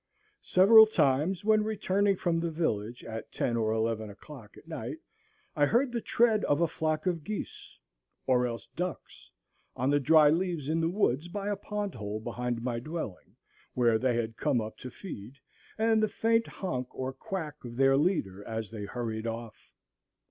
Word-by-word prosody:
Several 220 Hz, +4 st, +7 dB
times, 165 Hz, +1 st, +1 dB
when 215 Hz, -1 st, +4 dB
returning 205 Hz, -2 st, +1 dB
from 170 Hz, -2 st, 0 dB
the 170 Hz, 0 st, -1 dB
village 120 Hz, -8 st, -2 dB
at 110 Hz, -1 st, -7 dB
ten 120 Hz, -, -1 dB
or 110 Hz, -2 st, +1 dB
eleven 110 Hz, -1 st, -1 dB
o'clock 110 Hz, +1 st, -12 dB
at -, -, -16 dB
night, 165 Hz, -, -5 dB, 0.6 s
I 145 Hz, -2 st, +3 dB
heard 245 Hz, -, +2 dB
the 235 Hz, -1 st, -2 dB
tread 225 Hz, -2 st, +2 dB
of 145 Hz, -, +2 dB
a 170 Hz, -, +4 dB
flock 155 Hz, +1 st, -2 dB
of 170 Hz, -4 st, -1 dB
geese, 215 Hz, +4 st, -6 dB, 0.5 s
or 125 Hz, -1 st, +3 dB
else 115 Hz, -1 st, -6 dB
ducks, 180 Hz, -1 st, -5 dB, 0.5 s
on 130 Hz, +3 st, 0 dB
the 145 Hz, -, +4 dB
dry 150 Hz, +2 st, +6 dB
leaves 170 Hz, -4 st, -1 dB
in 160 Hz, +2 st, +1 dB
the 165 Hz, -, +1 dB
woods 170 Hz, -, +1 dB
by 200 Hz, +3 st, -4 dB
a 205 Hz, -, 0 dB
pond 205 Hz, 0 st, -4 dB
hole 105 Hz, -1 st, -5 dB
behind 120 Hz, +1 st, -3 dB
my 120 Hz, -2 st, -1 dB
dwelling, 155 Hz, -, -6 dB, 0.4 s
where 115 Hz, -3 st, +3 dB
they 125 Hz, -1 st, +1 dB
had 115 Hz, -1 st, -2 dB
come 140 Hz, -5 st, +1 dB
up 110 Hz, 0 st, -5 dB
to 130 Hz, -, -7 dB
feed, 125 Hz, -, -9 dB, 0.4 s
and 220 Hz, 0 st, +3 dB
the 215 Hz, -, +2 dB
faint 225 Hz, 0 st, +1 dB
honk 130 Hz, -10 st, -4 dB
or 130 Hz, 0 st, -3 dB
quack 160 Hz, -6 st, -6 dB
of 120 Hz, -1 st, -8 dB
their 135 Hz, +1 st, +4 dB
leader 135 Hz, -, 0 dB
as 110 Hz, -1 st, -4 dB
they 105 Hz, -3 st, -5 dB
hurried 115 Hz, 0 st, -4 dB
off. 115 Hz, -1 st, -7 dB
145 Hz, 175 wpm, -29 LUFS, 115-190 Hz, 0.6 s, Several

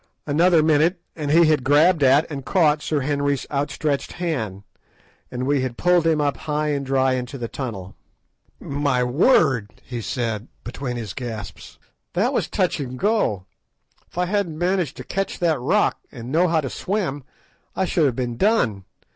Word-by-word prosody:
Another 165 Hz, +2 st, +4 dB
minute 160 Hz, +4 st, +3 dB, 0.2 s
and 150 Hz, -3 st, -4 dB
he 165 Hz, +3 st, +6 dB
had 155 Hz, -4 st, +2 dB
grabbed 155 Hz, +5 st, +4 dB
at 140 Hz, +3 st, +5 dB
and 140 Hz, -2 st, -5 dB
caught 155 Hz, -3 st, +2 dB
Sir 150 Hz, -2 st, -1 dB
Henry's 145 Hz, 0 st, -1 dB
outstretched 145 Hz, 0 st, -2 dB
hand, 115 Hz, -, -3 dB, 0.7 s
and 125 Hz, 0 st, -4 dB
we 140 Hz, 0 st, +2 dB
had 130 Hz, -2 st, -3 dB
pulled 180 Hz, -2 st, +3 dB
him 160 Hz, -2 st, +2 dB
up 145 Hz, -1 st, 0 dB
high 150 Hz, 0 st, -2 dB
and 140 Hz, -2 st, -1 dB
dry 135 Hz, -1 st, +2 dB
into 125 Hz, +2 st, -4 dB
the 120 Hz, -2 st, -4 dB
tunnel. 105 Hz, -8 st, -6 dB, 0.7 s
"My 140 Hz, -3 st, 0 dB
word!" 135 Hz, -, +3 dB
he 120 Hz, -2 st, -6 dB
said, 115 Hz, -2 st, -3 dB, 0.2 s
between 125 Hz, 0 st, -5 dB
his 110 Hz, -6 st, -5 dB
gasps, 115 Hz, -5 st, -7 dB, 0.4 s
"that -, -, +1 dB
was -, -, 0 dB
touch -, -, 0 dB
and 130 Hz, -2 st, -5 dB
go. 190 Hz, -, 0 dB, 0.6 s
If -, -, -19 dB
I 180 Hz, -, +2 dB
hadn't 180 Hz, -4 st, -1 dB
managed 175 Hz, -3 st, 0 dB
to -, -, -7 dB
catch 195 Hz, +1 st, -3 dB
that 165 Hz, -6 st, +1 dB
rock, 210 Hz, +12 st, +2 dB
and 120 Hz, -1 st, -8 dB
known 170 Hz, +4 st, +3 dB
how 160 Hz, -1 st, +2 dB
to 135 Hz, -, -4 dB
swim, 180 Hz, -9 st, -2 dB, 0.5 s
I 190 Hz, -, +1 dB
should 170 Hz, -3 st, +2 dB
have 125 Hz, -, -1 dB
been 120 Hz, -2 st, -3 dB
done. 120 Hz, -, +1 dB
145 Hz, 170 wpm, -22 LUFS, 125-165 Hz, 0.7 s, he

